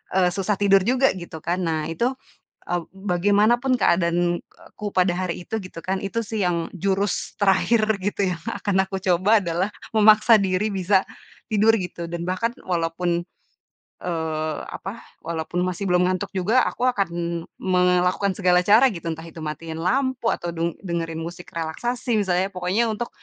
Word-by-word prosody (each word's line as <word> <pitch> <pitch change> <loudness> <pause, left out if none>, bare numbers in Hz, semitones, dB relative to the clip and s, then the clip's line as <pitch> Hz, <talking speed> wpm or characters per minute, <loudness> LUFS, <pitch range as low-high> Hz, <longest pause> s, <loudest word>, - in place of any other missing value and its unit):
eee, 185 -2 +4
susah 195 +3 -1
tidur 195 -1 +5
juga, 260 +2 +4
gitu 170 -2 -8
kan. 175 +2 -1
Nah, 160 -1 -1
itu, 235 +10 0 0.6
eee, 175 - +1 0.2
bagaimanapun 205 +7 +2
keadaanku 175 +3 0
pada 180 -1 +4
hari 180 -1 -3
itu, 220 - -2
gitu 185 -2 -9
kan. 190 +1 -1
Itu 195 +4 -2
sih, 215 -1 -2
yang, 170 -2 -1
jurus 195 +2 -1
terakhir 205 +3 +3 0.2
gitu, 200 -1 0
yang 165 - -8
akan 200 -2 -1
aku 190 0 -3
coba 190 +5 +4
adalah, 175 +2 0 0.3
memaksa 215 +1 +7
diri 190 +2 0
bisa 190 0 +2 0.5
tidur 220 +1 +4
gitu, 175 -2 -5
dan 170 0 -3
bahkan 185 +6 -1
walaupun, 170 0 -1 0.8
eee, 160 -3 -2
apa, 200 +5 -7 0.2
walaupun 165 +1 -3
masih 185 +2 -3
belum 180 0 +4
ngantuk 185 +2 -1
juga, 210 +8 +3
aku 245 - -3
akan 200 -7 +1 0.5
melakukan 180 +1 +2
segala 180 -2 +4
cara, 215 +7 +6
gitu. 170 -3 -8
Entah 160 0 -8
itu 165 0 -10
matiin 160 +2 -5
lampu, 260 +6 0
atau 175 - -3
deng 170 0 -2
dengerin 165 -2 -3
musik 175 +1 -8
relaksasi, 220 +8 -1
misalnya, 185 0 +1
pokoknya 185 +6 0
untuk 235 +3 -4
185 Hz, 155 wpm, -23 LUFS, 170-205 Hz, 0.8 s, memaksa